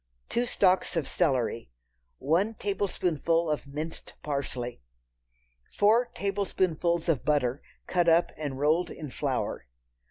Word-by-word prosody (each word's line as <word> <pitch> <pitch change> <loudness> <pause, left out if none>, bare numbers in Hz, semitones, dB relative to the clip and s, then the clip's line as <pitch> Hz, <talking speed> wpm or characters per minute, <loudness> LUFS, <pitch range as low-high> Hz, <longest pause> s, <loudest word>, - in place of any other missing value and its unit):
Two 245 +1 0
stalks 190 -6 +2
of 160 -5 0
celery. 130 - 0 0.5
One 180 +10 +1
tablespoonful 175 -5 0
of 150 -2 -2
minced 155 +4 -6
parsley. 130 - -3 1.0
Four 220 +4 +5
tablespoonfuls 185 -4 0
of 160 -6 +1
butter, 140 -3 +1 0.2
cut 175 -2 +2
up 165 +1 +4
and 145 -3 -4
rolled 155 +5 +2
in 150 -4 -7
flour. - - -2
165 Hz, 115 wpm, -28 LUFS, 145-185 Hz, 1.0 s, Four